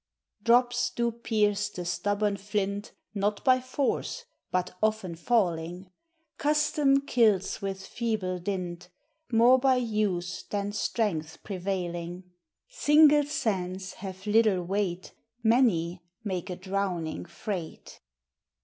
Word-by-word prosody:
Drops 245 +2 +3
do 235 0 0
pierce 210 -3 0
the 180 -4 -6
stubborn 205 +3 0
flint, 200 0 -3 0.2
Not 205 0 -1
by 255 -1 +5
force, 280 - -2 0.2
but 180 0 -1
often 215 -5 0
falling; 175 -2 -1 0.5
Custome 290 -2 +2
kills 220 -7 +2
with 195 -1 -4
feeble 210 -6 -2
dint, 180 -1 -4 0.4
More 240 +3 +6
by 260 0 +4
use 210 -7 -1
than 205 0 -2
strength 180 -8 -2
prevailing: 180 -2 -4 0.4
Single 300 -10 +5
sands 190 -8 -2
have 190 0 -8
little 210 -3 +3
weight, 185 -1 -2 0.3
Many 195 -8 +3 0.2
make 185 -4 -3
a 180 - -3
drowning 185 -4 -3
freight. 175 -1 -6
200 Hz, 105 wpm, -28 LUFS, 180-230 Hz, 0.5 s, More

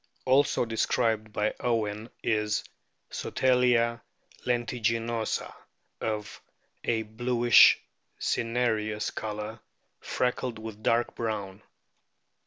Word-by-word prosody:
Also 130 -1 +3
described 110 -1 0
by 105 0 0
Owen 110 -2 -1
is 105 -1 +1 0.5
Sotalia 125 -2 +2 0.4
tentiginosa, 115 -2 -1 0.5
of 105 -2 -4 0.4
a 115 -1 0
bluish 120 +2 +5 0.4
cinereous 110 -3 0
colour, 105 +1 -5 0.4
freckled 125 -1 -1
with 110 -1 -8
dark 115 +2 +1
brown. 105 -3 -4
115 Hz, 75 wpm, -28 LUFS, 110-120 Hz, 0.5 s, bluish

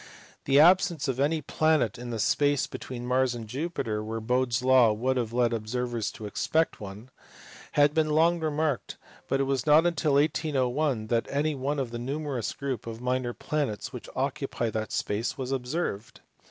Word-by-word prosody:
The 135 +1 +4
absence 175 -1 +5
of 130 -1 -2
any 150 +2 +1
planet 155 -8 +1
in 120 0 -6
the 115 - -3
space 145 +6 +2
between 120 -1 -7
Mars 125 0 +1
and 115 -2 -6
Jupiter, 120 -5 -3
where 110 +1 -4
Bode 125 +3 0
s 120 +2 0
law 130 -3 +6
would 125 +5 0
have 120 -3 -1
led 120 0 +2
observers 115 0 -2
to 110 - -8
expect 160 +9 0
one, 105 +5 -9 0.6
had 145 0 +4
been 155 -1 +2
long 165 +3 +3
remarked, 155 -3 -1 0.3
but 135 - 0
it - - +3
was 135 0 -1
not 150 +1 +7
till 150 -2 +1
1801 140 -4 +1
that 115 +1 0
any 150 +2 0
one 140 +2 -2
of 130 -4 -2
the 120 - -5
numerous 135 -2 -3
group 130 -5 -4
of 115 0 -6
minor 125 -1 -1
planets 145 -9 -3
which - - -8
occupy 115 -2 -2
that 110 0 -3
space 110 +7 -2
was 130 -1 -4
observed. 125 -4 -3
130 Hz, 180 wpm, -27 LUFS, 115-150 Hz, 0.6 s, not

